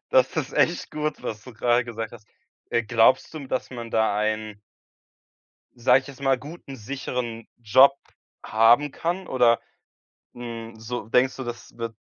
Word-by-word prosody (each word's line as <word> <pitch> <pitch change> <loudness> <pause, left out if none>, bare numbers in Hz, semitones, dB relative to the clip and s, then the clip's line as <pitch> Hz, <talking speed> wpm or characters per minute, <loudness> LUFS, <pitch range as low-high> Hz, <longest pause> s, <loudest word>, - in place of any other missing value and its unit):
Das - - +3
ist - - -2
echt - - +1
gut, 150 0 -3
was 105 -1 -5
du 125 - -12
grade 120 +2 +2
gesagt 115 -1 -6
hast. 110 -2 -13 0.4
Äh, 115 - +2
glaubst 115 +6 +3
du, - - -4
hm, 135 -3 -9
dass 130 - -2
man 120 -2 -7
da 110 -2 +2
einen 110 -1 -2 1.2
sage 125 +2 +4
ich - - -16
jetzt 140 0 -11
mal, 135 -1 +3
guten, 145 0 -10
sicheren 120 -1 -5
Job 130 +5 +6 0.5
haben 115 +7 +4
kann? 175 +6 -3
Oder, 120 -3 +3 0.7
hm, 115 -2 -7
so 110 0 -5
denkst 130 +3 +3
du, 130 - -5
das 120 -1 -8
wird 115 -1 -5
120 Hz, 165 wpm, -25 LUFS, 115-130 Hz, 1.2 s, Job